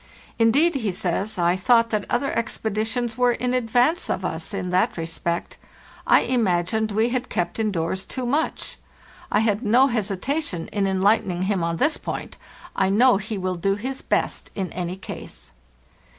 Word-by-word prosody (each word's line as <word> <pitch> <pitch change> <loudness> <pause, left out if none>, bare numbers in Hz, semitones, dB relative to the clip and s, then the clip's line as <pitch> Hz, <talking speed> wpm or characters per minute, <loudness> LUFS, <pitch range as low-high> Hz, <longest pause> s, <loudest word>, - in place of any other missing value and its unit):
'Indeed,' 280 +10 +4
he 225 -7 -1
says, 190 +4 -2
'I 175 +1 +2
thought 230 +3 +3
that 210 -2 -1
other 275 - 0
expeditions 225 +2 -2
were 245 -1 +4
in 250 +1 -1
advance 250 +7 +2
of 185 0 -1
us 160 0 -3
in 185 -2 -3
that 185 +5 +2
respect. 165 +1 -3 0.5
I - - +6
imagined 220 -2 +1
we 220 +3 +2
had 255 0 -2
kept 175 +4 -2
indoors 190 -3 -1
too 255 +4 -4
much.' 290 +6 -1 0.5
I 210 - +3
had 215 -1 +1
no 250 +3 +5
hesitation 220 - -2
in 200 -2 0
enlightening 190 -1 +2
him 190 -2 0
on 165 0 -1
this 300 - +2
point; - - -6 0.4
I 190 - +2
know 235 +3 +5
he 210 +2 -4
will 185 -1 -1
do 195 +3 0
his 260 +6 -5
best - - -1
in 190 -3 -3
any 180 0 -3
case. 190 - -9
210 Hz, 165 wpm, -23 LUFS, 185-245 Hz, 0.5 s, I